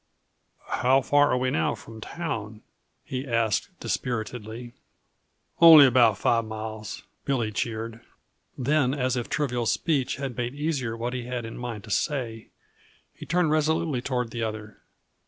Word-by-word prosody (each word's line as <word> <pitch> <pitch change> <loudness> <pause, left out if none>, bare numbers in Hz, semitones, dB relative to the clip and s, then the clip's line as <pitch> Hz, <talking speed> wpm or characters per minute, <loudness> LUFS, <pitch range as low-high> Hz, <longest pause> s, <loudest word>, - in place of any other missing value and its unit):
"How 130 +2 +3
far 145 +2 +4
are - - +2
we 130 0 0
now 80 - +1
from 110 -1 -12
town?" 110 -9 -5 0.4
he 130 +1 -5
asked 115 -4 +1
dispiritedly. 120 0 -4 0.9
"Only 160 -4 +10
about 120 -5 +5
five 115 +2 +2
miles," 110 -1 -6 0.2
Billy 120 -6 0
cheered. 115 +1 -4 0.6
Then, 135 0 +2
as 130 -2 0
if 120 -2 -3
trivial 125 -5 -1
speech 140 -3 +1
had 135 -2 -5
made 120 +2 -3
easier 140 -7 -2
what 120 +2 -3
he 125 -2 -4
had 125 -1 -4
in 115 - -7
mind 120 -4 -6
to 110 - -9
say, 115 -3 -2 0.6
he - - -11
turned 175 -2 +2
resolutely 155 -3 +1
toward 125 -3 -2
the 120 - -4
other. 110 -1 -5
120 Hz, 145 wpm, -26 LUFS, 115-135 Hz, 0.9 s, Only